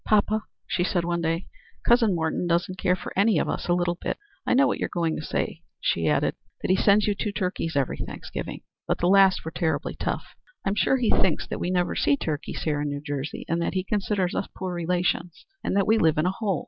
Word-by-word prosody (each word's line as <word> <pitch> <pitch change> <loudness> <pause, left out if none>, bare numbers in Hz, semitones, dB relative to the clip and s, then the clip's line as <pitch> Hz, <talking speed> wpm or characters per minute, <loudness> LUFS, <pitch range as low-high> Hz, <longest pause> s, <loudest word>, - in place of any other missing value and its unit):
"Poppa," 215 0 +2 0.2
she 175 - 0
said 175 -2 0
one 170 0 0
day, 165 +2 -1 0.4
"Cousin 230 -5 +4
Morton 160 +2 -1
doesn't 175 +2 0
care 180 -1 +3
for - - -7
any 200 -1 +4
of - - +1
us - - -3
a 175 - +3
little 175 0 0
bit. - - -2 0.3
I - - +4
know 275 +2 +6
what - - 0
you're - - -1
going 165 -2 0
to - - -4
say," - - -2 0.2
she 80 -1 +1
added; 75 -1 +2 0.3
"that - - +1
he - - +5
sends 200 +1 +4
you 210 - +2
two 210 +1 -2
turkeys 180 -5 -2
every 140 -3 0
Thanksgiving. - - -6 0.3
The 175 - +1
last 195 -2 +5
were 160 - -4
terribly 160 -2 -1
tough. - - -3 0.4
I'm 195 - +2
sure 240 +6 +3
he 240 -4 +2
thinks 185 - +2
that - - -5
we 175 - -1
never 180 -1 +1
see 285 - +3
turkeys 155 - -3
here 150 -2 0
in 145 - -1
New 145 0 -3
Jersey, 145 0 -4
and 170 +1 0
that 170 - -1
he 185 - +1
considers 200 -2 0
us - - -1
poor 185 -1 -3
relations 175 0 -1 0.2
and - - -1
that 200 - +3
we 220 +3 +4
live 160 -4 +3
in 155 - +2
a 180 - +3
hole. 195 -4 -1
180 Hz, 235 wpm, -26 LUFS, 165-200 Hz, 0.4 s, know